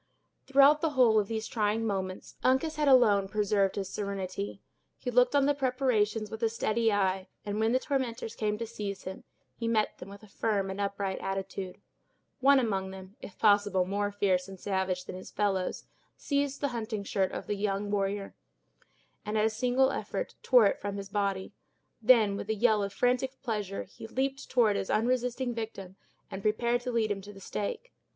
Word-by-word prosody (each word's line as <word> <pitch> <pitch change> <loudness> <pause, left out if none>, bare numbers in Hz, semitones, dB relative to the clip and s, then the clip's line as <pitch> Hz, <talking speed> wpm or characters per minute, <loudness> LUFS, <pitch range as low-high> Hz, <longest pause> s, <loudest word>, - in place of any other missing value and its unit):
Throughout 280 +2 +6
the 325 - +2
whole 225 -4 +6
of 205 - -1
these 220 0 -3
trying 215 0 0
moments, 190 -3 -3
Uncas 300 +5 +2
had 300 -1 +1
alone 215 -7 +5
preserved 200 -1 +1
his 195 -2 -3
serenity. 185 - -4 0.4
He 250 - -4
looked 250 +3 +4
on 280 -1 +4
the 290 - +3
preparations 250 -6 0
with 220 - -6
a 225 - +2
steady 225 0 +1
eye, 190 -1 +1 0.2
and 205 +1 -2
when 220 +1 +2
the 255 - +4
tormentors 255 -5 -2
came 210 -1 -1
to 230 - -3
seize 210 -3 -5
him, 190 +1 -7 0.3
he 230 - -3
met 220 -2 +1
them 180 - -9
with 200 +1 -12
a - - -13
firm 200 -2 -1
and 195 +1 -4
upright 200 -1 -2
attitude. 195 -1 -4 0.6
One 275 +1 +6
among 195 -7 0
them, 190 +1 -10
if 195 - -10
possible 205 -3 +3
more 205 +2 -1
fierce 190 -3 +1
and 190 -1 -10
savage 190 -2 -1
than - - -7
his 185 - -9
fellows, 195 -3 -1 0.3
seized 280 -1 -1
the 285 - +1
hunting 220 -3 -4
shirt 195 -1 0
of - - -5
the - - -1
young 205 0 -1
warrior, 200 0 -1 0.9
and 210 +1 -2
at 215 - +3
a 220 - +2
single 250 +4 +2
effort - - -4
tore 245 -4 +6
it 200 - +1
from 200 0 -3
his 200 0 -6
body. 200 -2 -1 0.5
Then, 220 -3 +5
with 205 - -6
a 220 - +1
yell 215 -1 +3
of 200 0 -2
frantic 255 +4 0
pleasure, 210 -5 -3
he 225 - -11
leaped 270 +4 -2
toward 225 -5 +3
his 190 - -3
unresisting 245 +2 0
victim 205 -5 -6 0.4
and 190 - -5
prepared 235 +3 +1
to 250 0 -3
lead 225 -3 +1
him 195 -1 -2
to 205 +2 -11
the 195 - -12
stake. 210 - -5
210 Hz, 190 wpm, -30 LUFS, 195-245 Hz, 0.9 s, Throughout